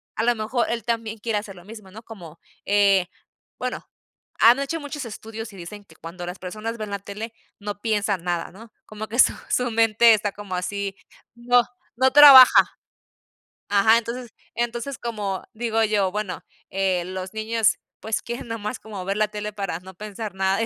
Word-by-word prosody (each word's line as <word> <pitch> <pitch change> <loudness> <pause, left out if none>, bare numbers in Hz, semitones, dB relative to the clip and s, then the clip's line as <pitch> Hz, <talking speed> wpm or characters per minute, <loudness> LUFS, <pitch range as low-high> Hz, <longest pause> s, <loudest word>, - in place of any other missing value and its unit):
a 225 - -1
lo 240 +1 +3
mejor 235 +2 -1
él 235 -2 -3
también 225 -2 -3
quiere 220 -1 -1
hacer 205 -2 -6
lo 175 - -14
mismo, 210 -2 -12
¿no?, 220 +3 -11
como, 175 -8 -12 0.3
eh, 200 -2 +4 0.5
bueno, - - -4 0.5
han 235 +4 +6
hecho 320 +4 -2
muchos 290 -2 -6
estudios 225 0 -8
y - - -12
dicen 205 +4 -9
que 160 - -19
cuando 175 +2 -8
las 180 +1 -6
personas 215 +5 -5
ven 215 -2 -6
la 200 - -3
tele 215 +3 -7 0.3
no 205 0 -6
piensan 205 -5 0
nada, 175 -2 -2
¿no?, 220 +4 -14 0.2
como 215 0 -7
que 235 +4 -5
su - - +6 0.2
su 250 -1 +1
mente 225 0 +5
está 205 -1 0
como 200 -2 -9
así 195 +2 -3 0.4
no, 245 +1 +3 0.3
no 260 +2 +3
trabaja 280 -3 +9 0.9
Ajá. 205 +3 +5
Entonces 235 0 -7 0.2
entonces, 240 +3 -3
como 210 -5 -4
digo 225 -1 0
yo: 205 -3 +1
"Bueno, 210 -2 -4 0.3
eh, 190 -2 0
los 185 +1 -6
niños, 220 0 +1 0.2
pues, 220 -1 -2
quieren 235 0 -6
nada 225 -1 -4
más 210 +4 -5
como 205 -4 -8
ver 195 +1 -2
la 215 0 +2
tele 210 0 -5
para 195 -5 -4
no 190 0 -13
pensar 210 +1 -7
nada 190 +2 +1
y - - +1
215 Hz, 185 wpm, -23 LUFS, 195-230 Hz, 0.9 s, trabaja